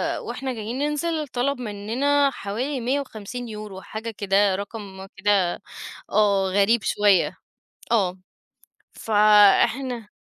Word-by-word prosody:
آآ - - -5
وإحنا 265 -1 -5
جايين 225 +2 -5
ننزل، 300 +1 -1
طلب 260 +1 -1
منّنا 250 +7 +1
حوالي 255 +5 -4
150€، 220 -5 -5
حاجة 220 +1 -6
كده، 200 -1 +2
رقم 200 -1 -7
كده 195 -3 +1 0.5
آه، 200 -2 +2
غريب 205 +2 +3
شوية. 205 -4 +2 0.6
آه، 190 -5 +1 0.7
فإحنا 215 +3 +3
215 Hz, 100 wpm, -23 LUFS, 200-255 Hz, 0.7 s, غريب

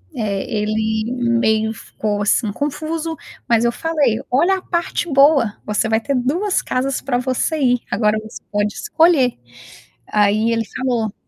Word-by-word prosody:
Eh, 205 -4 -2 0.2
ele 220 +1 -1 0.3
meio 220 -1 +1
ficou 205 -2 -4
assim 210 +1 +1
confuso, 315 +5 -3 0.3
mas 235 0 +3
eu 235 - +3
falei: 285 -5 0
"Olha 350 +9 +3
a - - -8
parte 340 -2 -2
boa, 275 -6 +4
você 210 +1 0
vai 220 0 +2
ter 280 +3 -1
2 335 +11 0
casas 265 +1 -2
para 250 -2 -1
você 260 +5 -1
ir, 250 -3 +2
agora 210 +1 +2
você 220 - -10
pode 205 0 0
escolher", 325 - +2 0.7
aí 210 +2 +2
ele 225 -1 0
falou 240 -5 -2
245 Hz, 150 wpm, -19 LUFS, 220-290 Hz, 0.7 s, boa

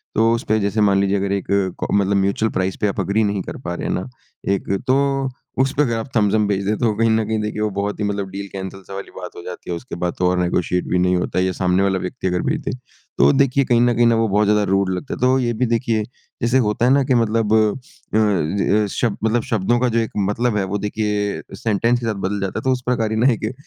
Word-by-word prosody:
तो 115 +1 +4
उसपे 110 -2 0
जैसे 100 +1 0
मान 100 -1 +4
लीजिए 100 0 +1
अगर 100 0 -1
एक 100 -1 -1 0.4
क - - -1
मतलब 100 0 +2
म्यूचुअल 100 +3 +1
प्राइस 95 0 -1
पे 105 - +3
आप 100 - -3
एग्री 110 +3 +1
नहीं 100 -1 0
कर - - -7
पा 85 - -2
रहे - - -4
हैं - - 0
ना 90 - -3 0.5
एक, 100 - -3 0.2
तो 135 0 +2 0.3
उसपे 135 +2 +1
अगर 120 -5 +1
आप 115 +4 -5
थम्स 105 -3 +3
अप 110 - +3
भेज 100 -1 -1
दे 105 - +2
तो 115 -3 +1
कहीं 115 +2 +2
न 110 0 +2
कहीं 110 +1 -1
देखिए 105 0 -3
वो 110 - +1
बहुत 100 +1 -2
ही - - -1
मतलब 100 -1 -2
डील 100 +1 -6
कैंसल 95 0 -6
सा - - -9
वाली 100 0 -7
बात 90 -1 -8
हो - - -8
जाती 90 0 -8
है। 85 - -1
उसके 120 +3 -7
बाद 90 0 -2
तो 90 - +2
और 90 0 +1
नेगोशिएट 90 0 0
भी 90 - +1
नहीं 90 0 +2
होता 90 +1 -1
या 95 0 +1
सामने 90 +1 +1
वाला 95 -1 +1
व्यक्ति 90 +1 -4
अगर 90 -1 0
भेज - - -1
दे। - - -1 0.5
तो - - +6
देखिए 140 0 +3
कहीं 120 -1 +3
न 120 0 +3
कहीं 120 +1 +4
न, 115 - +4
वो 115 0 +2
बहुत 105 +1 +2
ज़्यादा 105 0 +3
रूड 95 -1 +2
लगता 95 +10 -4
है। - - -6
तो 130 +1 +3
ये 120 -2 0
भी 120 +3 0
देखिए, 115 -2 0 0.4
जैसे 120 +2 +2
होता 105 +3 +1
है 125 - +4
ना 140 0 +4
कि 130 -1 +1
मतलब 115 -2 +1
अ, - - +6 0.6
ज 100 0 +2
शब्द 115 -4 -1
मतलब 110 +1 +1
शब्दों 115 +2 +1
का 125 - +2
जो 115 0 +1
एक 115 - -2
मतलब 105 +3 0
है 100 - +1
वो 95 +2 -2
देखिए 105 0 -2
सेंटेंस 115 +2 +1
के 120 - -5
साथ 115 - 0
बदल 100 +1 -2
जाता 95 -1 -2
है। - - -9
तो 130 - +2
उस 125 -1 0
प्रकार 115 -3 0
ही 110 - -1
ना 120 +4 +4
एक 110 +1 -3
105 Hz, 270 wpm, -20 LUFS, 95-115 Hz, 0.6 s, तो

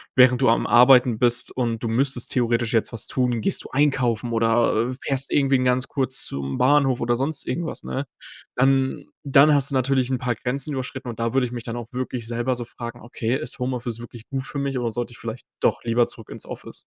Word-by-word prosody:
während 125 -1 +5
du - - +4
am 115 - +2
Arbeiten 125 -1 +6
bist 120 0 +4
und 115 -3 -1
du - - -1
müsstest 130 +1 +1
theoretisch 120 -1 0
jetzt 115 - +1
was 115 - +2
tun, 125 -2 0
gehst - - 0
du - - -9
einkaufen 125 -5 +1
oder, 115 +1 +2
äh, 130 - -6
fährst 135 -1 -1
irgendwen 135 -2 +2
ganz 125 +1 +1
kurz 135 -2 0
zum 70 0 -4
Bahnhof 135 -1 +3
oder 120 0 +1
sonst 140 +3 -2
irgendwas", 165 +5 -4
ne? 135 +2 -4 0.5
Dann 135 +2 +1 0.2
dann 140 +2 +6
hast 140 -1 +2
du - - -2
natürlich 130 0 +1
'n 130 - +1
paar 125 -2 -1
Grenzen 140 +4 -3
überschritten. 130 0 -5
Und 115 - -8
da 115 +1 -1
würde 135 -1 +2
ich 120 - -10
mich 120 -2 -5
dann 115 0 -5
auch 120 0 -9
wirklich 125 -2 -4
selber 120 +2 -1
so 120 -1 -5
fragen: 120 0 -8
„Okay, 120 0 -3
ist 155 - -4
Homeoffice 125 -2 -3
wirklich 120 -1 -11
gut 135 -1 -3
für 140 +1 -5
mich, 140 -1 -2
oder 120 -2 -2
sollte 120 +2 -4
ich - - -11
vielleicht 115 +1 -7 0.2
doch - - +1
lieber 120 +1 +2
zurück 115 - -10
ins - - -9
Office?" - - -9
125 Hz, 225 wpm, -23 LUFS, 120-135 Hz, 0.5 s, Arbeiten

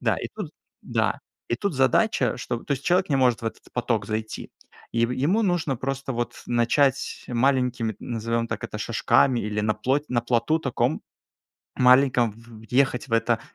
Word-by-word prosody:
Да - - +1
и - - -5
тут - - -5 0.3
да, - - -1 0.3
и - - +1
тут 200 -6 -2
задача, 130 - +2
что, 120 -1 -3
то 145 - -1
есть 140 +1 -3
человек 180 +2 +2
не 140 - +3
может 125 -4 +2
в - - -3
этот 115 - -5
поток 115 -4 -1
зайти. 110 +1 -4 0.4
И 115 0 +2
в 120 - -6
ему 170 - +1
нужно 175 -8 0
просто 135 +2 -3
вот 120 0 -4
начать 125 +3 +1
маленькими, 125 -2 +1
назовем 115 0 -2
так - - -4
это, - - -6
шажками 125 -3 +2
или 105 0 -2
на 105 0 +1
плоть 130 +7 0
на 120 -1 +1
плоту 120 +6 +1
таком 130 -2 -1 0.8
маленьком 125 -2 +4
в 115 0 -15
въехать 130 0 +1
в 115 - -16
это, 115 0 +2
125 Hz, 175 wpm, -25 LUFS, 115-135 Hz, 0.8 s, маленьком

